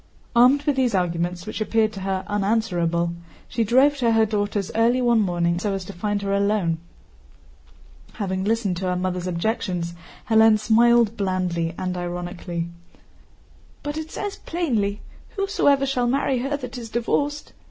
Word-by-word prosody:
Armed 255 +4 +5
with 290 -2 0
these 250 -5 +2
arguments, 175 0 -1
which 215 - -5
appeared 220 0 +1
to 195 - -7
her 190 0 -2
unanswerable, 185 -5 0 0.3
she 230 - -1
drove 265 +6 +4
to 235 -3 +2
her 225 0 +4
daughter's 205 -2 -2
early 235 +3 +3
one 240 -2 +3
morning 175 -3 0
so 200 +1 -1
as 190 -1 -5
to 200 - -8
find 205 +2 -2
her 195 0 -1
alone. 200 -5 +1 1.3
Having 190 -3 -2
listened 210 -4 0
to 185 - -3
her 180 - 0
mother's 180 0 -2
objections, 180 -2 -2 0.3
Hélène 220 -1 +6
smiled 230 0 +4
blandly 180 -3 -1
and 185 -1 -3
ironically. 175 -1 -4 1.2
"But 290 0 -3
it 315 0 -5
says 405 +4 -5
plainly: 225 - -1 0.3
'Whosoever 390 -9 +2
shall 255 -3 0
marry 265 0 +1
her 275 +3 -1
that 250 -2 -7
is 230 -2 -8
divorced... 290 +6 -1
210 Hz, 150 wpm, -23 LUFS, 180-240 Hz, 1.3 s, Hélène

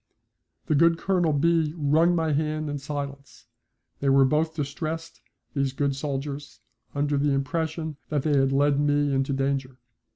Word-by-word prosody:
The - - +1
good 165 +3 +4
Colonel 175 -3 +1
B. 160 +1 +2
wrung 160 +4 +3
my 160 -2 +1
hand 155 0 -1
in 145 - -3
silence. 140 -1 -7 0.5
They 140 - +1
were 135 0 +6
both 155 +4 +1
distressed, 155 +2 -4 0.3
these 140 -2 0
good 140 0 0
soldiers, 140 0 -5 0.4
under 145 0 +1
the 145 0 +2
impression 160 +2 -2
that 150 -3 0
they 150 -2 +2
had 135 -1 +3
led 140 +1 +3
me 145 -1 +2
into 135 +1 0
danger. 135 -1 -1
145 Hz, 155 wpm, -26 LUFS, 140-155 Hz, 0.5 s, were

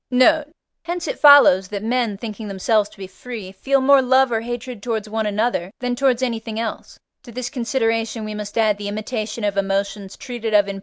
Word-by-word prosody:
Note. 295 +5 +4 0.4
Hence 345 0 -4
it - - -4
follows, 285 -11 +7
that 205 +1 -5
men, 230 -3 0
thinking 215 0 -7
themselves 205 +2 +1
to - - -19
be 195 - -7
free, 195 +1 -9
feel 270 +8 0
more 275 +1 +6
love 260 0 +3
or 225 -1 0
hatred 240 -1 -6
towards 220 -2 -3
one 220 0 -2
another 210 -3 -1
than 245 0 -2
towards 260 -1 +1
anything 225 -2 -3
else: 230 -1 -5 0.2
to 240 - -13
this 245 +1 -5
consideration 230 -3 -1
we 215 - -5
must 210 0 -6
add 215 -2 +2
the 205 - -5
imitation 215 +1 -4
of 205 -1 -1
emotions 200 0 -2
treated 230 -4 -4
of 205 -1 +5
in 200 0 -5
III. - - -8
225 Hz, 205 wpm, -21 LUFS, 205-250 Hz, 0.4 s, follows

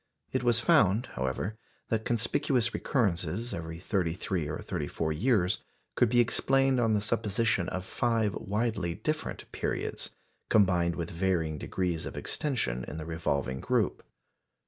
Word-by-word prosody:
It - - 0
was 120 -2 +4
found, 110 +1 +4
however, 65 - -2 0.3
that 110 -1 0
conspicuous 120 +1 +1
recurrences 105 - 0
every 80 -1 -5
thirty 90 -2 0
three 90 -3 -2
or 75 +2 -3
thirty - - -3
four 80 -1 -1
years 100 - +2 0.3
could 120 - +3
be 120 +1 +3
explained 135 +2 +3
on 115 -2 +3
the 105 - +1
supposition 105 -3 +1
of 95 0 -4
five 115 -2 +1
widely 100 -4 -1
different 155 +10 -3
periods, - - -2 0.4
combined 90 -5 +4
with 85 -1 -4
varying 85 -4 0
degrees 90 -4 -2
of - - -7
extension 65 - -1
in 75 - -6
the 80 - -5
revolving 70 -5 -1
group. - - +1
95 Hz, 145 wpm, -30 LUFS, 85-115 Hz, 0.4 s, was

